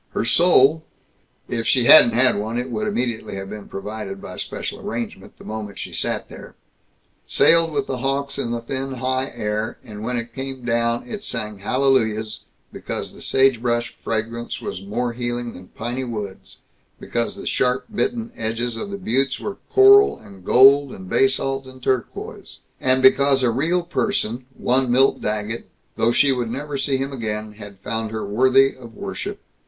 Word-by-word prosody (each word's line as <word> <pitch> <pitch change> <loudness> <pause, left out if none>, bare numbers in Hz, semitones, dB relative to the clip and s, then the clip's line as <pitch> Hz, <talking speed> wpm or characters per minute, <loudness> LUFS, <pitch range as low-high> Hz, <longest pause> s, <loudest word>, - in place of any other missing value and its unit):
Her - - -1
soul 160 +1 +5 0.6
if 115 -2 -2
she 125 - +4
hadn't 120 -4 +8
had 125 +2 +5
one, 110 +3 -3
it 125 +1 -3
would 215 - -2
immediately 120 - -2
have 95 0 -6
been 105 -1 -8
provided, 100 -1 -6
by - - -9
special - - -5
arrangement, 115 0 -6
the - - -14
moment 105 -2 -6
she - - -6
sat - - -1
there - - -12 0.7
sailed 165 -1 +4
with 140 -2 -1
the 130 - -4
hawks 135 +2 -1
in 115 - -2
the 120 0 -2 0.4
high 130 +1 0
thin 120 - -12
air, 105 0 -2
and 105 -4 -9
when 125 +3 -2
it 115 0 -5
came 135 -2 -6
down 115 0 0
it 210 -2 -6
sang 105 - -4
hallelujahs, 110 -2 +1 0.3
because - - -5
the - - -14
sagebrush 120 -3 +2
fragrance 115 +1 -3
was 90 - -6
more 120 +4 -2
healing 120 0 -3
than 90 0 -12
piney 120 +3 -4
woods, 105 -6 -7 0.4
because 120 0 -2
the - - -9
sharp 125 0 0
bitten 230 +2 -1
edges 115 +1 -2
of 115 - -5
the 200 - -5
buttes 135 - 0
were 205 - -5
coral 405 +1 +7
and 100 -3 -15
gold 135 +5 +6
and 95 -1 -10
basalt 135 0 +1
and 130 -1 -13
turquoise, 130 -2 -3 0.2
and 130 0 +2
because 135 0 +5
a 120 - +3
real 165 +9 +1
person, 150 - -1
one 130 +1 +1
Milt 135 +2 +3
Daggett, 105 +2 -3 0.3
though 115 - +2
she 140 +3 +4
would 125 -3 -1
never 140 +4 -4
see 135 0 0
him 135 +1 -3
again, 110 -3 -4
had 100 -2 -11
found 110 +1 -3
her 110 0 -4
worthy 130 +6 +4
of 120 -3 -13
worship. - - -5
120 Hz, 170 wpm, -22 LUFS, 110-135 Hz, 0.7 s, hadn't